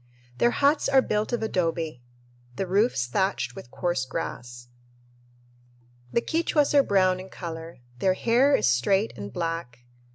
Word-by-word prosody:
Their 240 - +4
huts 285 +4 +2
are 265 -1 +5
built 210 +2 -1
of 240 -2 -1
adobe, 165 - -2 0.5
the 195 - -2
roofs 195 - +1
thatched 130 -3 -1
with - - -10
coarse 175 -1 -1
grass. 120 -1 -6 1.4
The 235 - +2
Quichuas 315 -3 +1
are 285 - +7
brown 185 -5 +2
in 190 +1 -9
color. 165 -6 -8 0.2
Their 185 +4 +2
hair 250 +7 +3
is - - +1
straight 160 - +2
and 100 0 -7
black. 165 -5 -4
185 Hz, 140 wpm, -26 LUFS, -, 1.4 s, are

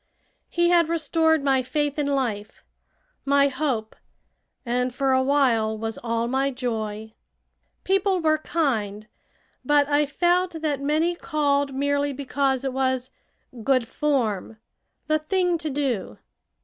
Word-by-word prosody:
He 345 0 +2
had 340 -2 +4
restored 320 -1 +2
my 270 -2 +3
faith 290 +3 -2
in 290 - 0
life, 235 -7 -2 0.6
my 280 0 +3
hope, 260 -6 -2 0.7
and 250 +1 0
for 265 +1 0
a 260 - +3
while 250 -6 +2
was 225 0 -4
all 230 0 -1
my 265 +2 +1
joy. 220 -4 -4 0.7
People 385 0 +1
were 310 -2 +2
kind, 220 -11 -1 0.6
but 290 -1 +3
I 290 0 +2
felt 350 +4 +1
that 290 -3 -1
many 310 +4 +1
called 285 -4 0
merely 285 +1 0
because 275 -1 -1
it 265 - -2
was 260 -1 -1 0.5
"good 255 -1 +2
form" 225 -9 -1 0.5
"the 310 -1 +1
thing 355 +2 0
to 315 - -3
do." 270 -7 -2
275 Hz, 130 wpm, -24 LUFS, 250-305 Hz, 0.7 s, had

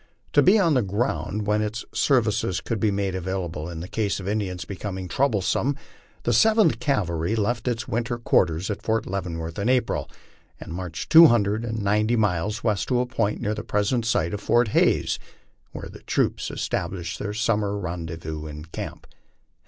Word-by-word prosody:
To 145 - +6
be 190 +8 +6
on 170 -6 +3
the 130 - +3
ground 100 -1 -2
when 105 +1 +2
its 110 +1 -3
ser 135 -3 +4
vices 105 -4 -1
could 115 -3 -3
be 110 - +2
made 100 -1 -1
available 90 -3 -3
in 85 -1 -6
case 100 +2 -1
the 95 +1 -3
Indians 95 -6 -2
became 95 -1 -5
troublesome, 130 +5 +1 0.5
the - - +1
Seventh 220 - +4
Cavalry 95 - 0
left 115 +3 -1
its 120 -1 -1
winter 120 -1 -1
quarters 90 -5 +1
at 100 - -5
Fort 110 0 0
Leavenworth 85 -3 -4
in 100 +4 0
April, 125 -1 +1 0.5
and - - -8
marched 90 -3 -5
two 165 0 +11
hundred 110 -3 +2
and 110 -2 -3
ninety 105 +3 +2
miles 105 +1 0
west 105 -4 0
to 125 -2 +2
a 125 - +1
point 115 -4 -1
near 105 - 0
the 105 - -5
present 105 +4 0
site 95 -6 0
of 105 - -4
Fort 120 -2 +3
Hays, - - +2 0.5
where - - -7
the - - -12
troops - - 0
established 85 -1 -3
their 105 0 -4
summer 105 -2 0
rendezvous 80 -4 -5
in 75 +1 -8
camp. 80 - -7
105 Hz, 175 wpm, -24 LUFS, 90-115 Hz, 0.5 s, two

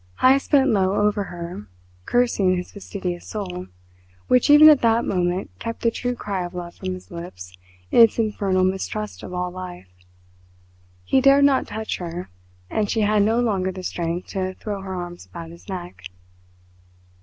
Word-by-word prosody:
Heyst 270 +2 +4
bent 275 -3 +4
low 195 -2 +2
over 205 -1 +1
her, 170 - -7 0.4
cursing 210 -7 +2
his 180 - -6
fastidious 185 -3 -5
soul, 180 -4 -5 0.6
which 250 +1 +3
even 295 +1 +9
at 300 -3 +7
that 230 0 +3
moment 180 0 -1
kept 230 0 -5
the 230 - +3
true 245 +2 -3
cry 200 -5 -3
of 175 +1 -7
love 175 -1 -6
from 185 -1 -4
his 185 - -13
lips 130 - -9 0.4
in - - +6
its 230 - +6
infernal 200 -4 +1
mistrust 195 +3 -2
of - - -8
all 180 0 -2
life. 180 - -9 1.1
He 265 - +2
dared 275 +1 +6
not 275 -2 +3
touch 220 0 -4
her 175 - -6 0.4
and 210 - -1
she 225 - +1
had 210 0 +3
no 220 +3 +2
longer 195 -5 0
the 185 0 -8
strength 170 0 -3
to 185 -1 -3
throw 205 -2 -5
her 190 -1 -5
arms 175 -1 -7
about 165 -1 -9
his 170 +4 -15
neck. 175 - -7
190 Hz, 170 wpm, -23 LUFS, 180-225 Hz, 1.1 s, even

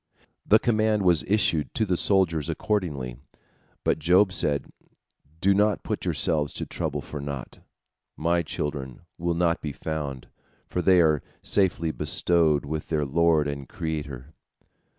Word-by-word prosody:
The 110 - +7
command 110 -2 +1
was 85 -4 +4
issued 95 -7 +1
to 110 - +1
the 90 -3 0
soldiers 85 -6 +1
accordingly, 75 - -2 0.7
but - - +1
Job 90 +4 +4
said, 70 -6 +1 0.7
"Do 100 +3 +4
not 105 0 +2
put - - -3
yourselves 75 -3 0
to - - -4
trouble - - -3
for 75 - -7
naught. 70 -2 -6 0.6
My 85 +2 +1
children 70 -4 -5 0.2
will 85 0 0
not 85 -1 +1
be 75 -2 -4
found, 70 -5 -5 0.4
for 90 - -2
they 90 -1 +5
are 75 -3 +3 0.2
safely 85 -5 +2
bestowed 75 0 +2
with 75 +2 -4
their 75 -2 0
Lord 80 +1 +2
and 70 -2 -5
Creator." 75 -4 -5
80 Hz, 140 wpm, -26 LUFS, 75-90 Hz, 0.7 s, The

